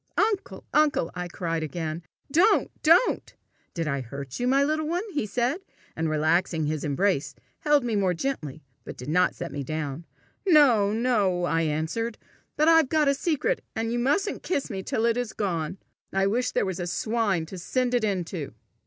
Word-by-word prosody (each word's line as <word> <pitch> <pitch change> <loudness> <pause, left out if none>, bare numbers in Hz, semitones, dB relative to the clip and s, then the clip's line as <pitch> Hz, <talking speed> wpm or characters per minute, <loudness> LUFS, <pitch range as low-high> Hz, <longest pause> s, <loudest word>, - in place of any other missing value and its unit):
"Uncle! 420 -2 0
uncle!" 295 - +3
I 180 -1 -4
cried 165 -2 -3
again. 160 +1 -4 0.3
"Don't! 375 +9 +4
Don't!" 335 +10 +3 0.4
"Did 165 -2 -2
I 140 -2 -1
hurt 135 +2 -7
you, 245 - 0
my 270 +2 +4
little 310 +1 0
one?" 350 +4 -1
he 290 -8 -1
said, 245 - 0 0.4
and 160 0 -1
relaxing 160 +1 +1
his 155 0 -2
embrace, 145 -3 0 0.2
held 295 -3 +3
me 235 -3 -1
more 190 -3 +1
gently, 160 - -4 0.2
but - - -9
did 125 +3 -7
not 180 +3 +2
set - - -6
me 145 - -4
down. 155 +2 -4 0.4
"No, 270 - +5
no!" 210 -6 +1
I 165 -2 +1
answered. 160 +9 -2 0.4
"But 305 - +3
I've 325 -4 +6
got 305 -3 +3
a - - +4
secret, 335 - -1
and 225 +1 -1
you 240 - 0
mustn't 375 - 0
kiss 280 -8 -2
me 190 -2 -3
till 220 +4 -1
it 235 0 +2
is 245 -2 -2
gone. 175 -4 -2 0.3
I 195 0 +1
wish 245 +5 +1
there - - 0
was 190 -2 -3
a 175 - -3
swine 210 -3 0
to 185 +3 -8
send 250 +7 -1
it 245 -2 +2
into!" 180 - -3
200 Hz, 185 wpm, -26 LUFS, 160-270 Hz, 0.4 s, I've